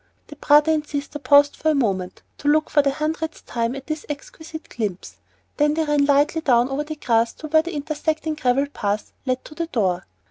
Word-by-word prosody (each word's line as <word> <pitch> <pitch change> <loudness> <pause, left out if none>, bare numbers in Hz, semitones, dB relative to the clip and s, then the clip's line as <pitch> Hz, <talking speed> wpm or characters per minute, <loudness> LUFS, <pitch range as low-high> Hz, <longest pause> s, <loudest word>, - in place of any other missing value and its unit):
The 295 - -9
brother 295 +2 +5
and 305 -1 0
sister 285 +1 -4
paused 285 +1 +5
a 315 -1 +3
moment 190 -8 -1 0.2
to 290 - -4
look 310 +1 +3
for 290 - +5
the 280 - +1
hundredth 310 +3 -3
time 235 +1 -2
at 270 -1 -8
this 310 -1 -4
exquisite 315 +2 -8
glimpse. 205 -6 -5 0.4
Then 295 0 +3
they 320 - +1
ran 295 -2 +2
lightly 290 +3 +3
down 245 -4 +3
over 275 +2 -1
the 310 +1 -6
grass 230 -5 +1
to 310 - -8
where 315 +1 +4
an 345 - -5
intersecting 310 +1 -2
gravel 275 -2 +1
path 210 -7 -3
led 255 0 -1
to - - -11
the 330 +2 -3
door. 185 - -1
290 Hz, 205 wpm, -22 LUFS, 255-310 Hz, 0.4 s, brother